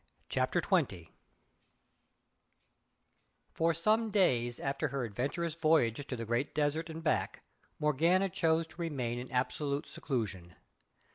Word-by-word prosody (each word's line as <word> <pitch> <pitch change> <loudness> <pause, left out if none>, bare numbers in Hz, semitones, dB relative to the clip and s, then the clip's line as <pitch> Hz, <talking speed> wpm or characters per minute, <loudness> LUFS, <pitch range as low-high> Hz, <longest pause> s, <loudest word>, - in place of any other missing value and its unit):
CHAPTER - - +1
XX 85 -3 0 2.4
For 165 +1 +2
some 215 +7 +2
days 125 - +2
after 140 +3 -1
her 135 -1 -2
adventurous 135 - -2
voyage 150 -6 +2
to 125 - -3
the 115 -1 -5
Great 120 +5 -1
Desert 155 +2 0
and 160 0 -7
back 155 - 0 0.3
Morgana 165 +6 +3
chose 165 -3 +1
to 165 +2 -11
remain 125 -8 -2
in 125 - -8
absolute 140 +3 -1
seclusion. 100 - -4
145 Hz, 120 wpm, -32 LUFS, 120-165 Hz, 2.4 s, Morgana